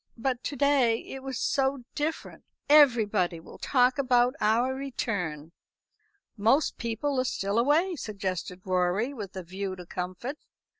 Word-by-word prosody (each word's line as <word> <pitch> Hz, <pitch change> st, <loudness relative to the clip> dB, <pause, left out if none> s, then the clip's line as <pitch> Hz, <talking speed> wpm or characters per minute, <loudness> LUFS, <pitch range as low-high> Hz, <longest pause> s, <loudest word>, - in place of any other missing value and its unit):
But 250 Hz, +1 st, -2 dB
to 290 Hz, -, -3 dB
day 265 Hz, -5 st, +3 dB
it 270 Hz, -, -7 dB
was 265 Hz, -2 st, -5 dB
so 270 Hz, -1 st, 0 dB
different. 310 Hz, +2 st, -4 dB, 0.2 s
Everybody 225 Hz, -, +4 dB
will 165 Hz, -, -13 dB
talk 255 Hz, 0 st, +2 dB
about 250 Hz, -2 st, +3 dB
our 235 Hz, +5 st, +2 dB
return." 190 Hz, -, -3 dB, 0.8 s
"Most 230 Hz, +8 st, +2 dB
people 240 Hz, +4 st, -1 dB
are -, -, +2 dB
still 200 Hz, -3 st, -1 dB
away," 315 Hz, +9 st, +2 dB
suggested 190 Hz, -, -4 dB
Rorie, 185 Hz, +7 st, +1 dB
with 205 Hz, -7 st, -7 dB
a 185 Hz, -, -5 dB
view 190 Hz, +2 st, -5 dB
to 180 Hz, -1 st, -10 dB
comfort. 185 Hz, -, -5 dB
235 Hz, 140 wpm, -28 LUFS, 190-270 Hz, 0.8 s, Everybody